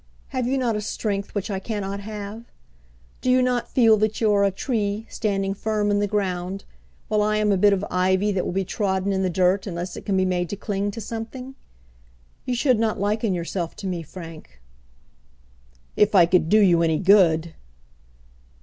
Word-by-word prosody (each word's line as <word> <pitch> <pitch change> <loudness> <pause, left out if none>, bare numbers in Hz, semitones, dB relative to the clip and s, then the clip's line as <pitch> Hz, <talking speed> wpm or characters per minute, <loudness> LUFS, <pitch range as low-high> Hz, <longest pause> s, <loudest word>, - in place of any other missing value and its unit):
Have 255 -3 -2
you 270 +2 0
not 240 -4 0
a 210 - -2
strength 200 -1 -3
which 205 +1 -2
I 190 - -2
cannot 200 -1 -4
have? 210 +2 -7 0.8
Do 255 - -1
you 255 0 +4
not 245 -1 0
feel 225 -4 +5
that 215 +1 0
you 220 -2 +3
are 200 0 +3
a 200 - +4
tree, 210 0 -2
standing 195 -2 -1
firm 210 0 -1
in 205 - +2
the 205 - +1
ground, 190 -2 -2 0.4
while 210 0 +1
I 215 0 +1
am 210 -1 +2
a - - +3
bit 205 +2 +5
of 200 0 0
ivy 190 +3 +2
that 190 -2 -1
will - - -3
be 190 +1 -1
trodden 195 0 -1
in 190 - 0
the 185 - +1
dirt 185 +3 +1
unless 175 0 -5
it - - -8
can 195 -2 0
be 185 - +2
made 180 -2 -1
to - - -3
cling 205 0 -2
to 225 +3 -6
something? 230 +4 -6 0.9
You 250 - 0
should 250 -2 +2
not 220 -2 0
liken 205 0 0
yourself 170 0 -4
to 200 - -9
me, 180 -3 -2
Frank." 165 - -11 1.4
"If 210 0 +3
I 175 -3 +8
could 170 -2 +2
do 215 - +5
you 175 -4 +4
any 160 -2 +2
good!" 170 -4 +4
200 Hz, 195 wpm, -23 LUFS, 185-215 Hz, 1.4 s, I